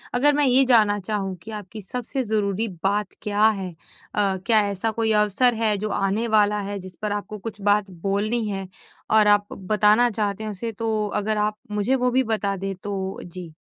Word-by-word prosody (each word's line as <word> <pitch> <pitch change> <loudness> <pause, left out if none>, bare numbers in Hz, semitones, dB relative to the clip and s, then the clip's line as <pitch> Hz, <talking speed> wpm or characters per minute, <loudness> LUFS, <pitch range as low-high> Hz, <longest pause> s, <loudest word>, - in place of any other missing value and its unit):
अगर 290 +4 +4
मैं 295 0 +2
ये 260 +1 +5
जानना 215 -5 +4
चाहूँ 195 -1 -3
कि 220 - -8
आपकी 210 0 -7
सबसे 250 +6 -3
ज़रूरी 215 -1 0 0.2
बात 205 +1 +1
क्या 210 0 +2
है? 195 -4 -1 0.5
अ, 195 -2 +2
क्या 225 -2 +5
ऐसा 200 +3 -2
कोई 225 0 0
अवसर 210 +4 +3
है, 220 -2 +1
जो 215 +2 -3
आने 200 +3 0
वाला 210 -1 +3
है 205 - -3
जिस 185 -1 -10
पर 210 -1 -2
आपको 205 +1 -4
कुछ 210 0 -7
बात 205 0 +2
बोलनी 215 +3 0
है 195 -1 -4 0.5
और 215 -1 +6
आप 205 0 +4
बताना 210 +4 +3
चाहते 210 -1 -2
हैं 215 - -3
उसे? 225 +3 -4
तो 220 -1 -1
अगर 210 +1 -1
आप 210 0 0
मुझे 210 +5 +1
वो 250 -1 +1
भी 260 +2 +3
बता 215 -4 -1
दें 195 +1 -3
तो 190 0 -5
जी। 175 -2 -9
210 Hz, 195 wpm, -23 LUFS, 200-225 Hz, 0.5 s, और